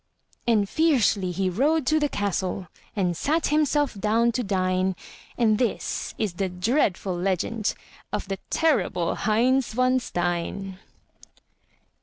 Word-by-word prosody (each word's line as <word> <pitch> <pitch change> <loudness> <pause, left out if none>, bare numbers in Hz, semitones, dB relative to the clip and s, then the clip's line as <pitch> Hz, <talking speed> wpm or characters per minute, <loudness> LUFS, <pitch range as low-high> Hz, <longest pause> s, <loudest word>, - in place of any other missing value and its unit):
And 215 -4 +3
fiercely 240 - +2
he 190 +2 -1
rode 280 - +1
to 310 +4 +3
the 295 -1 +1
castle 190 -4 -2 0.3
And 180 -4 0
sat 310 - 0
himself 295 -1 +2
down 220 +3 +2
to 250 - -1
dine; 185 -2 0 0.4
And 220 -3 +3
this 245 -4 -2
is 210 -5 -1
the 190 +1 -2
dreadful 190 - 0
legend 195 +4 -1 0.4
Of - - -3
the 195 -1 -4
terrible 205 - +1
Heinz 240 +4 +1
von 255 +2 +3
Stein. 180 -1 -3
210 Hz, 125 wpm, -25 LUFS, 185-255 Hz, 0.4 s, And